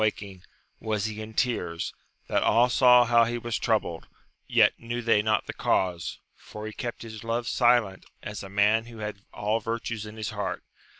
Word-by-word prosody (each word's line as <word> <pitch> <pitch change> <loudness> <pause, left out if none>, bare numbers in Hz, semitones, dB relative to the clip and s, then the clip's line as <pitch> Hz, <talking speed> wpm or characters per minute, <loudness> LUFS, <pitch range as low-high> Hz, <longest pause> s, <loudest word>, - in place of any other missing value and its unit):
255 110 - +2
waking, 95 -3 -11 0.4
was 105 -1 0
he 110 0 -4
in 110 0 -9
tears, 90 -11 -1 0.3
that - - +1
all 120 +3 +4
saw 125 0 +6
how 120 0 +5
he 120 +1 -1
was 120 -1 -3
troubled, 105 -7 -1 0.4
yet - - +5
knew 120 +1 -4
they 115 -3 +3
not 110 0 +1
the - - -5
cause, 90 -3 -1 0.2
for 105 0 -10
he 110 - -6
kept 120 +1 -5
his 110 -1 -9
love 115 +1 -2
silent, 120 -5 +2 0.2
as 105 0 -6
a 95 - -8
man 105 +3 +3
who 115 -1 -11
had 105 -2 -6
all 105 +2 -1
virtues 115 -1 -4
in 105 +1 -10
his 110 - -4
heart. - - -4
110 Hz, 190 wpm, -27 LUFS, 105-115 Hz, 0.4 s, saw